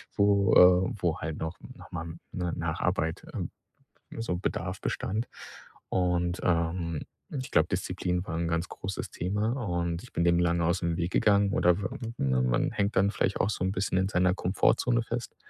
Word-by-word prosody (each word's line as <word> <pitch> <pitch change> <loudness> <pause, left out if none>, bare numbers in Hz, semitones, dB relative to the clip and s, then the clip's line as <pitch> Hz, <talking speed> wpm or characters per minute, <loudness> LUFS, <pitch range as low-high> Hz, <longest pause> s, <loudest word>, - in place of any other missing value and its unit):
wo, 100 -1 +4
äh 90 +1 +7
wo 85 -3 0
halt 80 -1 -4
noch 80 +1 -5 0.2
noch - - -14
mal 80 0 -5 0.2
'ne 90 -2 -2
Nacharbeit, 85 0 -1
ähm - - -4 0.7
so 90 -6 -1
Bedarf 90 0 -3
bestand. 110 +5 -2 0.6
Und, 90 -1 +1
ähm, 85 -2 0 0.3
ich 130 -3 -5
glaube, 80 - +4
Disziplin 90 0 -1
war 85 -1 -3
'n 85 0 -1
ganz 85 +2 -1
großes 95 0 -5
Thema. 105 +5 -1 0.2
Und 85 -1 -1
ich 125 - -14
bin 85 - +1
dem 85 0 +4
lange 85 0 +2
ausm 85 0 +1
Weg 85 +1 -2
gegangen 100 -1 +3
oder 90 0 +4
we 95 - -2 0.3
ne, 65 -2 +1
man 60 -1 +1
hängt 100 +1 -1
dann 100 +1 +4
vielleicht 95 - 0
auch 95 - +1
so 95 - -2
'n 95 - +1
bisschen 95 -1 -1
in 95 - +2
seiner 90 -2 +3
Komfortzone 115 +6 +2
fest. 115 +1 -5
90 Hz, 180 wpm, -28 LUFS, 85-95 Hz, 0.7 s, äh